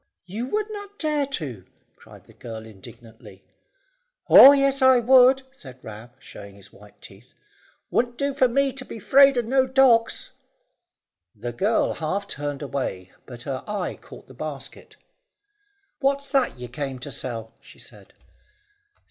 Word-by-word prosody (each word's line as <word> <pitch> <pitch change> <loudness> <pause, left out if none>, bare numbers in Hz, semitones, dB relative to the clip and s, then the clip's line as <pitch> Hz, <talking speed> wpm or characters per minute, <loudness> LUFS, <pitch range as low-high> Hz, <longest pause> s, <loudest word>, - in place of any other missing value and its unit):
"You 215 +7 -5
would 425 +7 -1
not 410 -1 -9
dare 300 -3 -1
to," 140 - -5 0.3
cried - - -17
the - - -20
girl 110 -2 -9
indignantly. 110 +2 -15 0.8
"Oh 275 - +10
yes, 275 -1 +1
I 260 -1 +6
would," 260 +2 +5
said 130 - -13
Ram, 110 +2 -10
showing 100 -1 -13
his 100 -1 -16
white 105 0 -19
teeth. 100 +6 -16 0.6
"Wouldn't 240 0 0
do 280 +1 -1
for 265 -2 +3
me 275 +2 0
to 270 - -8
be 245 - -10
'fraid 275 +5 +5
of 240 - 0
no 260 +2 +1
dogs." 255 -4 +2 1.0
The 120 +3 -6
girl 210 - 0
half 195 +6 -4
turned 145 -3 -5
away, 125 -10 -5 0.2
but 120 -2 -11
her 135 -2 -5
eye 205 -3 -4
caught - - -15
the - - -15
basket. - - -9 1.0
"What's 280 0 -1
that 270 - 0
you 125 0 -8
came 135 +2 -6
to 135 +3 -9
sell?" 115 -3 -7
she - - -18
said. - - -16
205 Hz, 150 wpm, -23 LUFS, -, 1.0 s, Oh